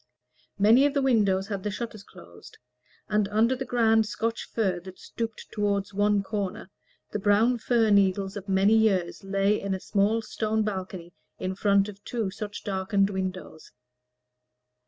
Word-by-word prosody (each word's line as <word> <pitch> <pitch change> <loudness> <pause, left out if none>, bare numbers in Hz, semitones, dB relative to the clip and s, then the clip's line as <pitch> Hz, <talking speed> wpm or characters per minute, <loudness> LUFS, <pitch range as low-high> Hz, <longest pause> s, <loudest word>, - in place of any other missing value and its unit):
Many 225 +7 +5
of 290 - -4
the 280 - +2
windows 200 -7 +2
had 200 -2 -3
the 210 - -3
shutters 215 -1 -6
closed, 85 - -15 0.5
and 210 -1 +1
under 220 +5 +2
the 265 +1 -5
grand 225 -3 +3
Scotch 225 +3 -3
fir 190 -6 0
that 185 +1 -12
stooped 230 -1 -6
toward 200 -2 -1
one 205 0 +1
corner, 200 -1 -4 0.4
the 210 - -2
brown 215 +5 +3
fir 225 -1 +2
needles 195 -1 +2
of 200 -1 -7
many 195 +2 +4
years 200 -7 +1
lay 195 +1 +1
in 200 -1 -2
a - - -5
small 210 +4 +1
stone 220 0 -1
balcony 185 -4 -5 0.2
in 185 0 -3
front 200 0 +2
of 205 0 -11
two 225 -5 -3
such 205 +1 -7
darkened 195 0 0
windows. 185 -4 -5
205 Hz, 155 wpm, -26 LUFS, 190-220 Hz, 0.5 s, Many